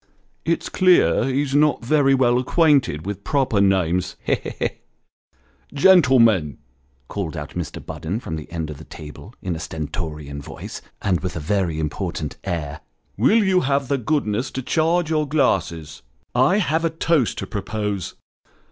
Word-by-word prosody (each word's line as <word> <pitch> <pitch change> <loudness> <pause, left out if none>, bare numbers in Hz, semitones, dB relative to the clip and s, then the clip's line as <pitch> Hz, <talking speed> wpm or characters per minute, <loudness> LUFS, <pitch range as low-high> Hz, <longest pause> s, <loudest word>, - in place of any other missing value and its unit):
" - - -44
It's - - -4
clear 185 -1 +4
he's 135 +1 -1
not 145 -4 +3
very 135 0 +4
well 125 -2 +3
acquainted 135 - +2
with 100 0 -5
proper 125 -4 +1
names. 90 -2 +1
He! - - +1
he! - - -3
he! - - 0 0.4
" - - -43
" - - -27
Gentlemen," 125 - +5 0.5
called 85 -5 -4
out 75 0 -6
Mr. 90 -3 -6
Budden, 90 +8 -4
from 80 - -5
the 80 0 -8
end 80 -3 -4
of 75 - -9
the - - -10
table, 80 - -11
in 90 -3 -2
a - - -6
stentorian 75 -2 -5
voice, - - -8 0.2
and 90 -4 +1
with 90 -1 -4
a - - -3
very 85 0 -1
important 80 -1 -3
air, 80 -6 -4 0.2
" - - -42
will 210 - +4
you 190 -2 +3
have 140 -4 0
the 140 -1 +1
goodness 125 -2 -1
to 130 - -5
charge 165 +3 +1
your 155 -1 +1
glasses? 85 - 0 0.3
I 130 +10 +4
have 165 -5 +1
a 165 - +2
toast 160 -5 +1
to - - -3
propose." 105 -2 -4
105 Hz, 170 wpm, -22 LUFS, -, 0.5 s, Gentlemen